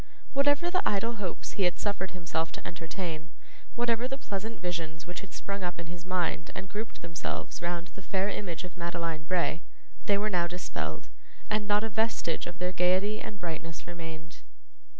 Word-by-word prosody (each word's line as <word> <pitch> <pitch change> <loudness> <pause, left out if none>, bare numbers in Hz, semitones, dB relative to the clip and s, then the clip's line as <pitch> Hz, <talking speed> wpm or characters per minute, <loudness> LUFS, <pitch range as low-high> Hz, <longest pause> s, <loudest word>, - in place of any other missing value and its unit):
Whatever 285 +5 +5
the 370 - +5
idle 230 +3 +2
hopes 190 -4 -2
he 200 - +1
had 180 - +3
suffered 195 -2 0
himself 170 -2 0
to - - -5
entertain, 165 -1 -3 0.5
whatever 235 0 +3
the 270 +1 -1
pleasant 215 -2 -3
visions 165 -2 -2
which 175 0 -4
had 195 - -9
sprung 200 0 -3
up 180 -1 -1
in 170 - -3
his 175 +2 -7
mind 165 - +1
and 190 - -3
grouped 210 0 -4
themselves 170 +1 -3
round 175 +1 -1
the 195 - -8
fair 190 +1 +2
image 190 -4 -1
of 180 -2 -7
Madeline 170 -2 -1
Bray, 170 -1 +2 0.5
they 200 - +6
were 210 +1 +2
now 175 -2 +4
dispelled, 180 +1 -3 0.4
and 210 -1 +3
not 205 +1 +5
a 225 - +1
vestige 220 -5 +2
of 175 +1 -6
their 180 0 0
gaiety 185 +4 +4
and 205 - -5
brightness 165 -1 -3
remained. 165 -1 -6
180 Hz, 180 wpm, -31 LUFS, 170-205 Hz, 0.5 s, they